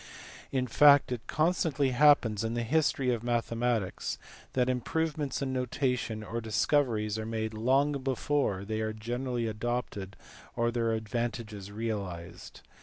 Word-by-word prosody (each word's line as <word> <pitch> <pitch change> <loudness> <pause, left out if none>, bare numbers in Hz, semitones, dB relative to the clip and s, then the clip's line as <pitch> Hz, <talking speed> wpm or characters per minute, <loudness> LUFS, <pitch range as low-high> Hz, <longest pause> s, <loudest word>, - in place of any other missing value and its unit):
In 130 -2 +1
fact 145 +1 +6
it 120 -1 -4
constantly 155 -4 +1
happens 125 -6 +4
in 115 +1 -2
the 120 - -1
history 135 -1 +2
of 115 - -3
mathematics 115 -3 -1 0.4
that 125 -1 +2
improvements 145 +2 -1
in 130 -1 -2
notation 125 -3 -1
or 115 +2 -4
discoveries 110 -1 +1
are 110 - -4
made 110 -1 -2
long 130 +6 +2
before 130 -6 0
they 110 +1 -2
are 110 0 -2
generally 120 +2 -3
adopted 110 -3 -3 0.4
or 120 0 +1
their 115 -1 0
advantages 110 -2 -3
realized. 100 -6 -5
120 Hz, 130 wpm, -30 LUFS, 110-130 Hz, 0.4 s, fact